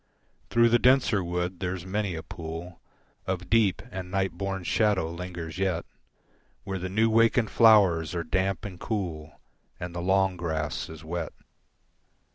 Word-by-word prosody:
Through 115 Hz, 0 st, +4 dB
the 120 Hz, +1 st, +4 dB
denser 125 Hz, -6 st, +4 dB
wood 90 Hz, +1 st, -2 dB
there's 90 Hz, -1 st, -3 dB
many 100 Hz, -1 st, -2 dB
a 80 Hz, -, -6 dB
pool 85 Hz, +1 st, -8 dB, 0.5 s
Of 90 Hz, -1 st, -3 dB
deep 105 Hz, -4 st, +3 dB
and 95 Hz, -1 st, -6 dB
night 95 Hz, 0 st, 0 dB
born 95 Hz, +1 st, -4 dB
shadow 100 Hz, -3 st, +2 dB
lingers 85 Hz, -1 st, -6 dB
yet 95 Hz, -3 st, 0 dB, 0.8 s
Where 95 Hz, -1 st, -4 dB
the 90 Hz, +1 st, -4 dB
new 110 Hz, +4 st, +3 dB
wakened 115 Hz, +1 st, +3 dB
flowers 95 Hz, -8 st, +5 dB
are 85 Hz, -, -1 dB
damp 95 Hz, +4 st, -1 dB
and 90 Hz, -4 st, -7 dB
cool 85 Hz, -8 st, -4 dB, 0.4 s
And 90 Hz, -1 st, -5 dB
the 85 Hz, -, -4 dB
long 95 Hz, 0 st, +2 dB
grass 80 Hz, -3 st, -3 dB
is 80 Hz, -1 st, -10 dB
wet. 85 Hz, 0 st, -4 dB
90 Hz, 150 wpm, -27 LUFS, 85-100 Hz, 0.8 s, flowers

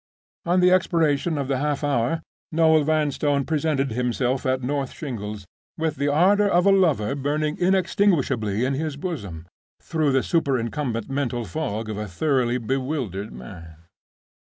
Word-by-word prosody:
On 180 Hz, +1 st, +3 dB
the 180 Hz, 0 st, +5 dB
expiration 165 Hz, -3 st, +2 dB
of 140 Hz, -2 st, -2 dB
the 135 Hz, -1 st, 0 dB
half 145 Hz, 0 st, -1 dB
hour 145 Hz, +3 st, 0 dB, 0.3 s
Noel 160 Hz, -1 st, +4 dB
Vanstone 145 Hz, -2 st, +1 dB
presented 150 Hz, -4 st, 0 dB
himself 125 Hz, +2 st, -1 dB
at 130 Hz, 0 st, 0 dB
North 135 Hz, 0 st, -2 dB
Shingles, 105 Hz, -, -6 dB, 0.3 s
with 160 Hz, -2 st, -1 dB
the 140 Hz, +2 st, 0 dB
ardor 190 Hz, +8 st, +4 dB
of 175 Hz, -1 st, +3 dB
a 200 Hz, -, +6 dB
lover 160 Hz, -, +2 dB
burning 150 Hz, +2 st, -1 dB
inextinguishably 175 Hz, -, +1 dB
in 135 Hz, -, 0 dB
his 150 Hz, +1 st, -3 dB
bosom, 100 Hz, -, -5 dB, 0.3 s
through 155 Hz, -3 st, 0 dB
the 135 Hz, -1 st, +2 dB
superincumbent 130 Hz, -6 st, -1 dB
mental 125 Hz, -4 st, -2 dB
fog 105 Hz, +4 st, -3 dB
of 110 Hz, -1 st, -4 dB
a 105 Hz, -, -4 dB
thoroughly 125 Hz, -, 0 dB
bewildered 130 Hz, -, -3 dB
man. 80 Hz, +7 st, -10 dB
140 Hz, 145 wpm, -24 LUFS, 120-160 Hz, 0.3 s, a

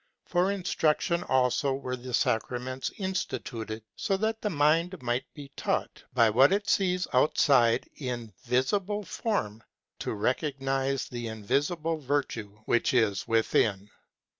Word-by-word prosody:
For 180 Hz, +2 st, +2 dB
instruction 170 Hz, -3 st, +1 dB
also 130 Hz, +1 st, +2 dB
were 130 Hz, -2 st, -4 dB
the 125 Hz, -1 st, -3 dB
sacraments 125 Hz, +3 st, -1 dB
instituted, 115 Hz, -, -4 dB
so 195 Hz, -, 0 dB
that 220 Hz, +2 st, -1 dB
the 210 Hz, -, 0 dB
mind 165 Hz, +3 st, +2 dB
might 120 Hz, +1 st, -2 dB
be 140 Hz, -2 st, -10 dB
taught -, -, -2 dB
by 115 Hz, -2 st, +6 dB
what 130 Hz, +6 st, +6 dB
it 205 Hz, +1 st, +1 dB
sees 185 Hz, -2 st, +2 dB
outside 125 Hz, -3 st, +4 dB
in 120 Hz, -6 st, -5 dB
visible 195 Hz, -, 0 dB
form, 115 Hz, -, -2 dB, 0.4 s
to -, -, -3 dB
recog 130 Hz, +7 st, -1 dB
nize 135 Hz, 0 st, -1 dB
the 120 Hz, -1 st, -5 dB
invisible 145 Hz, -, -1 dB
virtue 135 Hz, -6 st, -2 dB, 0.2 s
which 120 Hz, +2 st, +2 dB
is 105 Hz, -5 st, +2 dB
within. 105 Hz, -3 st, +1 dB
135 Hz, 130 wpm, -28 LUFS, 120-170 Hz, 0.4 s, by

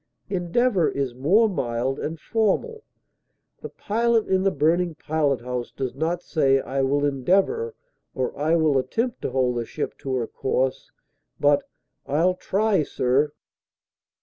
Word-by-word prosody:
Endeavor 185 Hz, +1 st, +2 dB
is 135 Hz, -3 st, -2 dB
more 175 Hz, -, +3 dB
mild 130 Hz, -, -2 dB
and 160 Hz, +1 st, -4 dB
formal; 230 Hz, -, 0 dB, 0.8 s
the -, -, -6 dB
pilot 230 Hz, +1 st, 0 dB
in 190 Hz, 0 st, +2 dB
the 195 Hz, -, +3 dB
burning 165 Hz, +2 st, +1 dB
pilot 150 Hz, -5 st, 0 dB
house 125 Hz, 0 st, -4 dB
does 130 Hz, -2 st, -4 dB
not 165 Hz, +5 st, -2 dB
say 135 Hz, -4 st, +2 dB
"I 135 Hz, +1 st, -2 dB
will 140 Hz, +2 st, +1 dB
endeavor" 195 Hz, -, +1 dB, 0.4 s
or 130 Hz, -1 st, -2 dB
"I 155 Hz, +4 st, +1 dB
will 155 Hz, -4 st, +3 dB
attempt 230 Hz, -, -2 dB
to -, -, -2 dB
hold 125 Hz, -2 st, 0 dB
the 120 Hz, -, -2 dB
ship 150 Hz, -, -4 dB
to 135 Hz, -1 st, -3 dB
her 120 Hz, -2 st, 0 dB
course," 130 Hz, +2 st, -2 dB, 0.5 s
but 145 Hz, 0 st, +2 dB, 0.4 s
"I'll 165 Hz, +6 st, +2 dB
try, 195 Hz, +1 st, +1 dB
sir!" 140 Hz, +1 st, +1 dB
155 Hz, 145 wpm, -24 LUFS, 135-190 Hz, 0.8 s, more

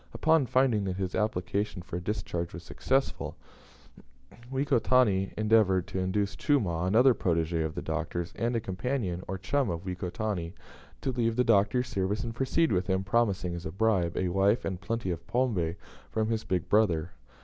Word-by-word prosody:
Upon 160 Hz, -4 st, +3 dB
finding 125 Hz, -5 st, +2 dB
that 95 Hz, -1 st, -2 dB
his 95 Hz, -1 st, -2 dB
application 100 Hz, -2 st, -1 dB
for 85 Hz, -, -5 dB
a -, -, -5 dB
discharge 90 Hz, -3 st, -3 dB
was 85 Hz, +1 st, -8 dB
successful, 135 Hz, +8 st, -1 dB, 1.2 s
Wekotani 125 Hz, -7 st, +2 dB
endeavoured 105 Hz, -4 st, +3 dB
to 95 Hz, -, -3 dB
induce 95 Hz, +1 st, -1 dB
Chumah, 90 Hz, -, +1 dB
another 120 Hz, +7 st, +5 dB
protege 85 Hz, -4 st, 0 dB
of 80 Hz, -1 st, -3 dB
the -, -, -4 dB
Doctor's, 85 Hz, 0 st, -3 dB
and 120 Hz, +1 st, -1 dB
a -, -, +2 dB
companion, 95 Hz, -2 st, -2 dB
or 95 Hz, -, -3 dB
chum, 125 Hz, +7 st, 0 dB
of 85 Hz, +1 st, -4 dB
Wekotani, 90 Hz, -1 st, -3 dB, 0.5 s
to 135 Hz, -, -1 dB
leave 115 Hz, -2 st, 0 dB
the 125 Hz, -, +3 dB
Doctor's 115 Hz, +3 st, +3 dB
service 100 Hz, 0 st, -1 dB
and 115 Hz, -1 st, -4 dB
proceed 135 Hz, +6 st, +1 dB
with 90 Hz, -1 st, +1 dB
him, 95 Hz, 0 st, +1 dB
promising, 100 Hz, -4 st, +1 dB
as 85 Hz, -1 st, -5 dB
a -, -, -5 dB
bribe, 95 Hz, -4 st, +1 dB
a 90 Hz, -, 0 dB
wife 100 Hz, +5 st, +2 dB
and 95 Hz, -1 st, -3 dB
plenty 115 Hz, -2 st, -2 dB
of 85 Hz, -1 st, -6 dB
pombe 105 Hz, -10 st, 0 dB, 0.3 s
from 110 Hz, 0 st, -1 dB
his 115 Hz, -1 st, -1 dB
"big 90 Hz, -3 st, -1 dB
brother." 90 Hz, -6 st, +2 dB
100 Hz, 170 wpm, -29 LUFS, 90-115 Hz, 1.2 s, another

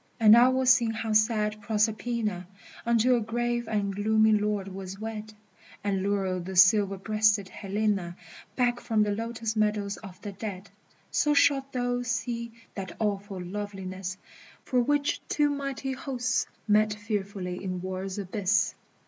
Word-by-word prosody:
And 220 Hz, -1 st, +8 dB
I 240 Hz, +2 st, +7 dB
will 260 Hz, 0 st, +1 dB
sing 245 Hz, -2 st, +5 dB
how 220 Hz, 0 st, -2 dB
sad 215 Hz, -1 st, +2 dB
Proserpina 215 Hz, -2 st, -1 dB, 0.4 s
Unto 235 Hz, +2 st, +4 dB
a 235 Hz, -, +1 dB
grave 240 Hz, +1 st, -1 dB
and 200 Hz, -3 st, -1 dB
gloomy 220 Hz, +1 st, +3 dB
Lord 210 Hz, -2 st, +1 dB
was 190 Hz, 0 st, -7 dB
wed, 220 Hz, -1 st, -6 dB, 0.5 s
And 195 Hz, -2 st, 0 dB
lure 195 Hz, -2 st, 0 dB
the 185 Hz, +2 st, -6 dB
silver 195 Hz, +2 st, +5 dB
breasted 215 Hz, -1 st, +2 dB
Helena 200 Hz, -3 st, -1 dB, 0.4 s
Back 245 Hz, -1 st, +1 dB
from 220 Hz, -3 st, +1 dB
the 210 Hz, -, 0 dB
lotus 225 Hz, +1 st, -3 dB
meadows 210 Hz, -1 st, 0 dB
of 195 Hz, -4 st, -11 dB
the 205 Hz, -, -5 dB
dead, 195 Hz, -1 st, -7 dB, 0.4 s
So 295 Hz, 0 st, +2 dB
shalt 275 Hz, -1 st, +3 dB
thou 245 Hz, -1 st, -1 dB
see 235 Hz, 0 st, -3 dB, 0.2 s
that 190 Hz, -3 st, -6 dB
awful 200 Hz, -2 st, -2 dB
loveliness 190 Hz, -1 st, -5 dB, 0.5 s
For 250 Hz, -1 st, +1 dB
which 290 Hz, +3 st, +1 dB
two 295 Hz, -1 st, +2 dB
mighty 275 Hz, -1 st, -3 dB
Hosts 255 Hz, -3 st, -1 dB, 0.2 s
met 210 Hz, 0 st, +3 dB
fearfully 200 Hz, -3 st, -4 dB
in 185 Hz, -1 st, -3 dB
war's 185 Hz, +1 st, -4 dB
abyss! 200 Hz, 0 st, +1 dB
215 Hz, 145 wpm, -28 LUFS, 195-235 Hz, 0.5 s, And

